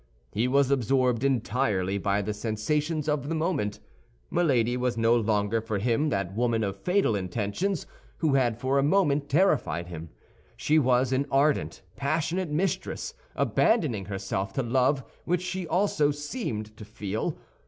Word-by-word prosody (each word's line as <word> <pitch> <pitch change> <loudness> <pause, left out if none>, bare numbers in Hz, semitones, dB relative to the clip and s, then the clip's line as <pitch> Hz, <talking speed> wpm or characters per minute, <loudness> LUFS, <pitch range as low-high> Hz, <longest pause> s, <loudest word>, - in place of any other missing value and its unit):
He 115 +4 0
was 140 +1 +3
absorbed 130 -1 +2
entirely 110 -7 0
by 100 +1 0
the 105 +2 -2
sensations 150 +9 -1
of 150 -2 -1
the 165 - -1
moment. 155 - -1 0.5
Milady 125 -9 +2
was 125 -1 -1
no 115 +1 +4
longer 110 -1 +1
for 110 -2 -3
him 120 +8 +1
that 100 -7 -2
woman 115 -1 +1
of 100 -1 -4
fatal 180 - +2
intentions 105 - -2 0.3
who 155 -4 +1
had 120 -5 +2
for 130 +2 +1
a - - +2
moment 145 -4 +2
terrified 140 - +2
him; 85 -1 -7 0.5
she 155 +1 +3
was 125 -1 +2
an 140 +2 +1
ardent, 140 +2 +1
passionate 160 +5 -1
mistress, 170 +6 -2 0.2
abandoning 145 - +2
herself 95 0 -3
to 135 - -1
love 130 +3 +2 0.2
which 180 +1 0
she 185 -1 -3
also 175 -6 +2
seemed 145 - -4
to - - -9
feel. 105 0 -4
130 Hz, 150 wpm, -27 LUFS, 105-150 Hz, 0.5 s, no